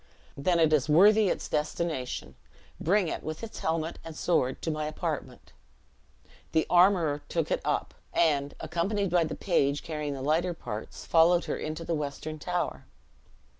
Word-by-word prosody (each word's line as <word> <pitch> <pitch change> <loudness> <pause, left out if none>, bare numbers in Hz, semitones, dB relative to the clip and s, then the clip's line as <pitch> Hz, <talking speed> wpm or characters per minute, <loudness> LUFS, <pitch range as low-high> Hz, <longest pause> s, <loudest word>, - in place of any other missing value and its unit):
"Then 170 +5 +1
it 160 -1 +4
is 150 -1 +2
worthy 205 +6 +6
its - - -2
destination. 150 -3 -2 0.5
Bring 190 +2 +2
it, - - -3
with 155 +6 -6
its 225 - -7
helmet 160 0 -2
and 165 -1 -8
sword, 135 -7 +1
to 165 - 0
my 155 0 -2
apartment." 155 - -5 1.0
The 160 - +3
armorer 175 -5 +4
took 165 -3 -1
it - - +1
up; - - -1 0.2
and, 145 -4 +1
accompanied 195 +2 -1
by 175 -2 +3
the 155 - -4
page 145 -6 +1
carrying 150 -3 -3
the 130 - -6
lighter 165 +5 +1
parts, 110 -8 -7
followed 170 +1 +4
her - - -2
into 155 +2 -5
the 170 - -1
western 150 +1 -4
tower. 180 +3 -3
160 Hz, 160 wpm, -28 LUFS, 150-175 Hz, 1.0 s, worthy